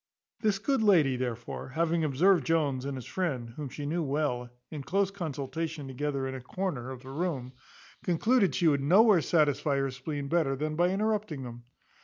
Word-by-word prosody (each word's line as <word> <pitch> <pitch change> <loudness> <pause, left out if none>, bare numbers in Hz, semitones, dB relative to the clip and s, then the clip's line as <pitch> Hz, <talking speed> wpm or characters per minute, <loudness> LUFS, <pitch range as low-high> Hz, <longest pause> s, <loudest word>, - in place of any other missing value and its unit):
This 210 -3 +1
good 265 +5 0
lady, 165 -11 +4
therefore, 120 -2 -4
having 165 +3 0
observed 160 +4 +3
Jones, 140 -4 +1
and 140 -1 -3
his 125 - -7
friend, 135 -11 -2
whom 140 +3 -6
she 145 +3 -6
well 145 -4 0
knew, - - -14 0.3
in 145 - -4
close 195 +8 0
consultation 160 -3 -4
together 135 0 -2
in 130 - -4
a 130 - -6
corner 135 -3 -3
of 130 -2 -8
the 130 - -9
room, 140 -5 -3 0.5
concluded 200 +4 +2
she 175 - +1
could 145 -4 +4
nowhere 190 +5 +6
satisfy 145 -3 +2
her 135 -1 0
spleen 140 +2 -5
better 150 -3 +1
than 155 +3 -2
by 175 +2 +3
interrupting 205 -7 -1
them. 120 -1 -9
150 Hz, 180 wpm, -29 LUFS, 135-175 Hz, 0.5 s, nowhere